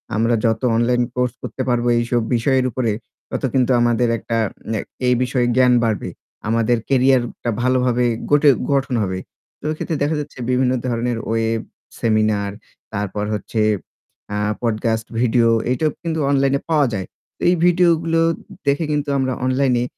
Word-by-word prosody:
আমরা 115 +2 +2
যত 115 -1 +1
online 120 +1 +2
course 125 -1 0
করতে - - -5
পারবো 120 0 +1
এইসব 120 0 0
বিষয়ের 130 +2 +2
উপরে 115 -1 0 0.4
তত - - -4
কিন্তু 130 -1 +2
আমাদের 120 0 +2
একটা 115 +1 -3 0.4
আ - - -2 0.3
এই 125 - +5
বিষয়ে 125 -1 0
জ্ঞান 125 -1 +5
বাড়বে। 110 -2 -1 0.4
আমাদের 115 +1 +2
কেরিয়ার 130 -1 +4 0.2
টা 120 - 0
ভালোভাবে 125 -1 +2 0.3
গটে 145 0 +6 0.2
গঠন 135 -2 +1
হবে। 95 -1 -2 0.4
তো - - -29
এক্ষেত্রে 155 +1 -3
দেখা 155 +2 +1
যাচ্ছে 145 -2 -7
বিভিন্ন 125 0 +2 0.2
ধরনের 120 0 -1
ওয়েব, 115 0 0 0.4
সেমিনার, 110 -3 +1 0.4
তারপর 105 0 -2
হচ্ছে 105 +2 -2 0.7
আ - - -1 0.2
পডকাস্ট 110 -1 -1
ভিডিও 120 -1 +3 0.2
এটাও 150 +5 +1
কিন্তু 165 -1 -2
অনলাইনে 140 0 +2
পাওয়া 150 -4 +3
যায়। 95 -2 -3 0.3
তো - - -22
এই 180 - +4
ভিডিওগুলো 165 -2 +3 0.5
দেখে 145 +4 +2
কিন্তু 145 -1 -1
আমরা 130 -1 0
অনলাইনে 130 -2 +2
125 Hz, 150 wpm, -20 LUFS, 115-135 Hz, 0.7 s, গটে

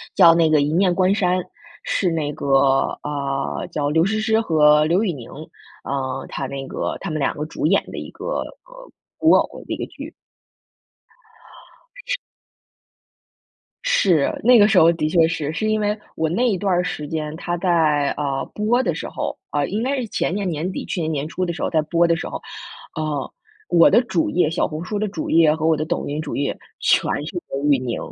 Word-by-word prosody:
叫 165 - +8
那 165 -1 +3
个 155 - +4
《一 145 +1 0
念 180 +2 +2
关 185 +1 +3
山》， 185 -3 +1 0.5
是 185 - 0
那 155 -3 -1
个， 140 - -6 0.5
啊， 140 -2 -3
叫 145 -2 -1
刘 160 +3 +3
诗 215 +3 0
诗 220 0 +2
和 150 -6 +4
刘 175 +6 +2
宇 200 - 0
宁， 125 -7 -9 0.5
啊， 135 -1 -3
他 135 - -4
那 135 0 -6
个 - - -3
他 - - -4
们 155 - -2
两 140 - 0
个 150 - -3
主 155 - -4
演 195 +4 +3
的 - - -7
一 - - -6
个， - - -10 0.4
呃， - - -14 0.3
古 - - +4
偶 - - +1
的 - - -3
一 - - -4
个 - - -3
剧。 - - -10 1.9
是 - - 0 1.7
是， 190 - +2
那 245 +1 +7
个 205 -1 +6
时 195 -3 +4
候 165 0 +6
的 155 -2 -1
确 165 0 +4
是， 155 -2 -2
是 215 +7 -2
因 215 0 +1
为 210 +1 0 0.2
我 160 - 0
那 200 +10 +1
一 200 -5 0
段 195 +1 0
儿 175 0 +1
时 155 -5 -4
间， 155 -1 -4
它 175 +1 -3
在， 160 -5 +2
呃， 140 -2 -2
播 225 +4 +1
的 175 -9 -1
时 165 - -5
候， - - -4
啊， 145 -1 0
应 210 +8 -2
该 270 +3 0
是 255 -3 -3
前 175 - -1
年 200 -1 -2
年 165 +2 -2
底， - - -5
去 180 - -3
年 160 -1 -1
年 145 -2 -2
初 185 +3 -2
的 170 - -2
时 170 - -7
候 - - 0
在 160 - +2
播 170 +2 +2
的 170 - +3
时 165 - -5
候， - - -6 0.5
呃， 155 -3 -3 0.4
我 165 -1 +6
的 240 - +5
主 310 +6 0
页 180 - +2
小 165 - 0
红 155 +2 -6
书 205 +3 -3
的 215 +1 -1
主 190 -5 -5
页 160 -2 +5
和 160 0 -2
我 160 -1 +3
的 155 - -2
抖 - - -2
音 145 +2 -3
主 155 -2 -5
页， 140 - -2 0.2
全 - - +3 0.3
是 - - -6 0.2
刘 140 +1 -3
宇 135 - +3
宁 125 -2 -3
165 Hz, 230 characters per minute, -21 LUFS, 150-195 Hz, 1.9 s, 叫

